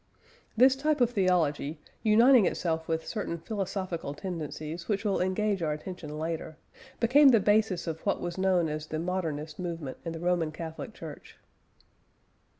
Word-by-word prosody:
This 260 +3 +6
type 300 +2 0
of 245 -1 +3
theology, 170 -7 +1 0.2
uniting 230 +1 +6
itself 160 -2 -1
with 160 0 -1
certain 200 -6 -3
philosophical 185 -5 -4
tendencies 165 -1 -5
which 205 0 -1
will 200 -3 +1
engage 195 +1 0
our 155 -2 0
attention 155 -1 -7
later, 160 0 -4 0.4
became 275 +5 +6
the 235 -4 +6
basis 205 -2 +2
of 160 -1 -4
what 200 - 0
was 175 -1 -4
known 185 -3 +2
as 155 0 -4
the 155 - -3
Modernist 160 -3 -3
movement 165 -7 -4
in 165 - -4
the 165 - -6
Roman 175 -2 +1
Catholic 160 +6 -7
Church. 155 -3 -10
175 Hz, 150 wpm, -29 LUFS, 160-205 Hz, 0.4 s, This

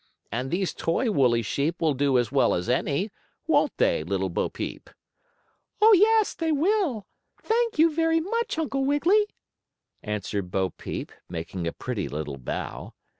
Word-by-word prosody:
And 125 +4 -2
these 185 +3 -1
toy 215 +8 0
woolly 125 - +3
sheep 145 - -1
will 160 -3 +2
do 135 -1 +2
as 120 0 0
well 140 -1 +3
as 90 - -3
any; 145 - 0 0.3
won't - - +2
they, - - +2
Little 95 +2 -1
Bo - - -1
Peep?" - - -6 0.9
"Oh, 440 +1 +7
yes, 430 +2 +4
they 325 -1 -1
will; 310 - +1 0.4
thank 460 -2 +1
you 320 +1 +5
very 325 +1 +2
much, 460 +4 -2
Uncle 275 -4 -1
Wiggily," 340 +10 +3 0.7
answered 105 -2 -3
Bo 95 0 0
Peep, - - -6 0.2
making 85 +1 -4
a - - -1
pretty 120 -7 -4
little 75 -2 -5
bow. 65 - -5
165 Hz, 155 wpm, -26 LUFS, -, 0.9 s, Oh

